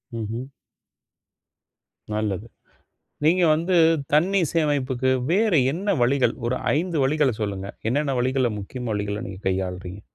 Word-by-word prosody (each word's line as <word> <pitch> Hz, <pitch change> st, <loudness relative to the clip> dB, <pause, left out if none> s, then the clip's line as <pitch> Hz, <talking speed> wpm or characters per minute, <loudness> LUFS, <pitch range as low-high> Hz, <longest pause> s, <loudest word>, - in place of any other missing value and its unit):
ம்ஹ்ம். 115 Hz, +3 st, -4 dB, 1.7 s
நல்லது. 105 Hz, -1 st, -2 dB, 0.8 s
நீங்க 175 Hz, +4 st, +4 dB
வந்து 170 Hz, +4 st, 0 dB, 0.4 s
தண்ணீ 185 Hz, +6 st, +3 dB
சேமைப்புக்கு 135 Hz, -5 st, +1 dB, 0.2 s
வேற 210 Hz, +4 st, +2 dB, 0.2 s
என்ன 195 Hz, +5 st, -1 dB
வழிகள்? 130 Hz, +2 st, +2 dB
ஒரு 125 Hz, +2 st, 0 dB, 0.2 s
5 170 Hz, +1 st, -1 dB
வழிகளச் 135 Hz, -5 st, +1 dB
சொல்லுங்க. 100 Hz, -2 st, -3 dB, 0.2 s
என்னென்ன 140 Hz, +1 st, 0 dB
வழிகள, 130 Hz, -1 st, +1 dB
முக்கிய 125 Hz, +6 st, -7 dB
வழிகள 105 Hz, 0 st, -2 dB
நீங்கக் 95 Hz, +1 st, -9 dB
கையாள்றீங்க? 95 Hz, 0 st, -3 dB
130 Hz, 110 wpm, -24 LUFS, 105-155 Hz, 1.7 s, நீங்க